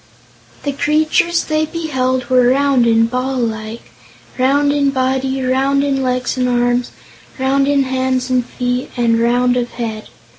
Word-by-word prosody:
The 285 - -1
creatures 310 +4 +1
they 310 0 -1
beheld 260 -6 -2
were 255 -1 +3
round 270 -2 +2
and 230 0 +3
ball 255 +2 -2
like; 220 -1 -4 0.5
round 285 +3 +2
in 285 -1 +2
body, 265 0 -1
round 270 +2 +1
in 275 -1 0
legs 255 0 -1
and 250 -1 0
arms, 245 0 +1 0.5
round 275 +1 +1
in 280 -1 +2
hands 260 -1 -1
and 250 -1 +2
feet 250 +1 -3
and 230 -1 +2
round 245 +1 +2
of 240 -1 -1
head. 220 -2 -5
260 Hz, 150 wpm, -17 LUFS, 245-275 Hz, 0.5 s, were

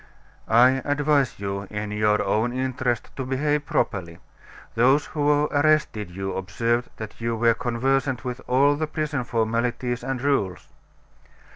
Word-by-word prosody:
"I 125 +3 +5
advise 145 -3 +1
you, 100 0 -4
in 105 0 -4
your 105 0 +2
own 115 +3 0
interest, 130 -2 -2
to 135 - -2
behave 145 +3 -1
properly. 85 -5 -1 0.6
Those 130 +5 +3
who 145 -1 +1
arrested 145 - +2
you 95 +2 -4
observed 115 +6 -1
that 110 +1 -8
you 115 0 -1
were 115 +1 +3
conversant 130 +3 -1
with 125 0 -4
all 140 +3 +4
the 155 +1 -2
prison 150 -3 -2
formalities 120 +1 -1
and 135 0 -2
rules." 100 - -1
125 Hz, 135 wpm, -24 LUFS, 110-140 Hz, 0.6 s, I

